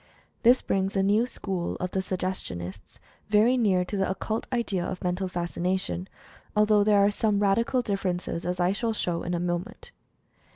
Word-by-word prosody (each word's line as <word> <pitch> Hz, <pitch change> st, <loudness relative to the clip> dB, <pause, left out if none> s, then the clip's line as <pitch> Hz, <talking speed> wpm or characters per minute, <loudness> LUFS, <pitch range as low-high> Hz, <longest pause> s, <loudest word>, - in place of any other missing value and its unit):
This 245 Hz, +2 st, +5 dB
brings 195 Hz, 0 st, 0 dB
the 195 Hz, -, +2 dB
new 210 Hz, +5 st, +3 dB
school 190 Hz, -7 st, -3 dB
of 180 Hz, 0 st, -4 dB
the 190 Hz, -, 0 dB
Sug 185 Hz, -1 st, -4 dB
gestionists 95 Hz, -, -5 dB, 0.3 s
very 215 Hz, +4 st, +4 dB
near 195 Hz, -7 st, +2 dB
to 205 Hz, -, -5 dB
the 195 Hz, -1 st, +1 dB
occult 215 Hz, +4 st, -3 dB
idea 220 Hz, -7 st, 0 dB
of 180 Hz, 0 st, -5 dB
"Mental 180 Hz, +1 st, -1 dB
Fascination," 180 Hz, +1 st, -2 dB, 0.5 s
although 210 Hz, -1 st, +4 dB
there 205 Hz, -1 st, +5 dB
are 205 Hz, -, +3 dB
some 210 Hz, 0 st, +1 dB
radical 230 Hz, +5 st, +2 dB
differ 195 Hz, -4 st, 0 dB
ences, 175 Hz, -1 st, -4 dB
as 180 Hz, 0 st, -2 dB
I 175 Hz, +1 st, +3 dB
shall 225 Hz, +3 st, -1 dB
show 175 Hz, -5 st, -1 dB
in 175 Hz, -, -2 dB
a -, -, -1 dB
moment. 175 Hz, +6 st, -4 dB
190 Hz, 180 wpm, -27 LUFS, 180-210 Hz, 0.5 s, This